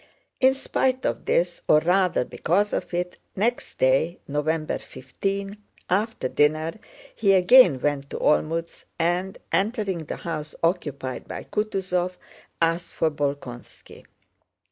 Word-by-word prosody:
In 265 +1 +5
spite 260 -1 0
of - - -2
this, 175 0 +1
or 150 - +6
rather 180 -3 +2
because 180 +13 0
of - - -2
it, 180 0 -3 0.2
next 235 +5 -1
day, 135 +7 +2
November 155 +2 -1
15, 195 +10 -4 0.3
after 205 - 0
dinner 155 +4 +1 0.4
he 200 -3 +3
again 185 - +7
went 140 0 -1
to - - -5
Olmütz 165 +2 0
and, 175 +3 0
entering 200 -5 0
the - - -4
house 155 -3 -5
occupied 145 -7 -2
by - - -6
Kutúzov, 190 -4 -1 0.5
asked 165 +1 0
for 160 - +1
Bolkónski. 140 -4 -6
170 Hz, 120 wpm, -25 LUFS, 150-195 Hz, 0.5 s, again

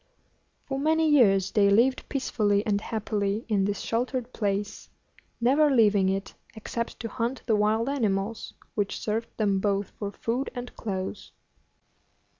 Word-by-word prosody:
For 270 -1 -3
many 320 +2 +2
years 205 -11 +4
they 200 -2 +4
lived 240 +6 +3
peacefully 210 -7 0
and 205 -1 +1
happily 215 -1 -2
in 200 -4 +1
this 205 0 -2
sheltered 250 +1 -2
place, 205 -1 -2 0.5
never 280 +6 +4
leaving 210 -7 +4
it 195 0 -3 0.2
except 230 +2 -5
to 230 - -3
hunt 235 +3 -3
the 225 - +2
wild 215 +3 +2
animals, 220 -5 -1 0.2
which 205 -2 -2
served 225 +2 -2
them 200 -3 +1
both 200 0 -1
for 205 -1 -5
food 240 +6 -2
and 245 0 -7
clothes. 190 -2 -5
215 Hz, 140 wpm, -27 LUFS, 200-245 Hz, 0.5 s, years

